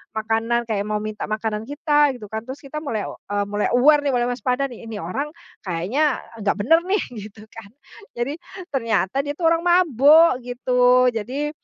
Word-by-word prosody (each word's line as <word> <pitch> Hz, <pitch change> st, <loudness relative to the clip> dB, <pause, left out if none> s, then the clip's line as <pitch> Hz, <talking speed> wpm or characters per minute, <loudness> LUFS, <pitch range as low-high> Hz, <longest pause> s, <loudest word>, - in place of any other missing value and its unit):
makanan, 225 Hz, +2 st, 0 dB
kayak 200 Hz, -2 st, 0 dB
mau 210 Hz, 0 st, -1 dB
minta 215 Hz, -1 st, -5 dB
makanan 215 Hz, 0 st, -3 dB
kita 295 Hz, -2 st, +2 dB
gitu 215 Hz, -4 st, -10 dB
kan, 220 Hz, 0 st, -4 dB
terus 260 Hz, +2 st, -7 dB
kita 275 Hz, +2 st, -7 dB
mulai 230 Hz, -9 st, -3 dB
o -, -, -10 dB, 0.2 s
eee, 205 Hz, 0 st, +1 dB
mulai 205 Hz, 0 st, -1 dB
aware 295 Hz, +4 st, +5 dB
nih, 280 Hz, -, +1 dB
mulai 240 Hz, 0 st, +1 dB
waspada 250 Hz, +3 st, -1 dB
nih, 240 Hz, -2 st, -12 dB
"Ini 225 Hz, -2 st, -7 dB
orang 275 Hz, -, -4 dB, 0.3 s
kayaknya 210 Hz, -, 0 dB, 0.2 s
enggak 200 Hz, -, +1 dB
benar 325 Hz, +11 st, +4 dB
nih." 385 Hz, +2 st, +1 dB, 0.2 s
Gitu 210 Hz, 0 st, -10 dB
kan. 220 Hz, -2 st, -12 dB, 0.4 s
Jadi 245 Hz, +5 st, -3 dB, 0.3 s
ternyata 230 Hz, 0 st, 0 dB
dia 290 Hz, -, -3 dB
itu 300 Hz, -, -25 dB
orang 330 Hz, +1 st, +2 dB
mabuk 315 Hz, -5 st, +5 dB
gitu. 250 Hz, 0 st, +3 dB
Jadi, 265 Hz, +7 st, -3 dB
245 Hz, 180 wpm, -22 LUFS, 215-290 Hz, 0.4 s, aware